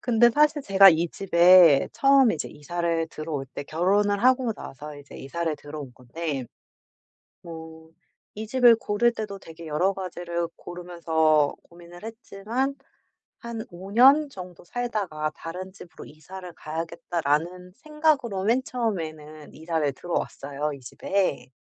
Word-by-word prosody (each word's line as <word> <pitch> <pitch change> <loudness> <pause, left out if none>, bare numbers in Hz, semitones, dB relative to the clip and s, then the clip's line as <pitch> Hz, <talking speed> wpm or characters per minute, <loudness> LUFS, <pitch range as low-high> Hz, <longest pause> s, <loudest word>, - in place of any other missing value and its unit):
근데 240 0 +4
사실 300 +2 +2
제가 195 -2 +7
이 165 +1 +1
집에 175 -5 +5
처음에 275 -5 +4
이제 150 - -5
이사를 165 +2 -2
들어올 155 -4 -5
때 - - -4
결혼을 200 +6 +1
하고 255 -2 +3
나서 145 -1 -9
이제 140 -1 -13
이사를 160 +3 -3
들어온 145 -3 -9
건데 135 +2 -5 1.0
뭐 160 -1 -11 0.4
이 215 +1 -6
집을 240 0 +5
고를 225 +2 +1
때도 210 -3 -6
되게 165 0 -12
여러 160 +6 +1
가지를 175 -2 -4
고르면서 160 -4 0
고민을 175 +2 -14
했지만 230 +4 -4 0.6
'한 235 -2 -6
5 185 +2 -10
년 275 +6 +6
정도 180 -6 -11
살다가 195 -9 -3
다른 185 +3 -7
집으로 180 -3 -13
이사를 180 +4 -11
가야겠다.'라는 165 +2 -3
생각으로 290 -9 0
맨 235 +5 +2
처음에는 155 - -5
이사를 160 -2 -1
들어왔어요 145 -2 -4
이 - - -10
집에. 135 +1 -2
175 Hz, 290 characters per minute, -25 LUFS, 155-220 Hz, 1.0 s, 제가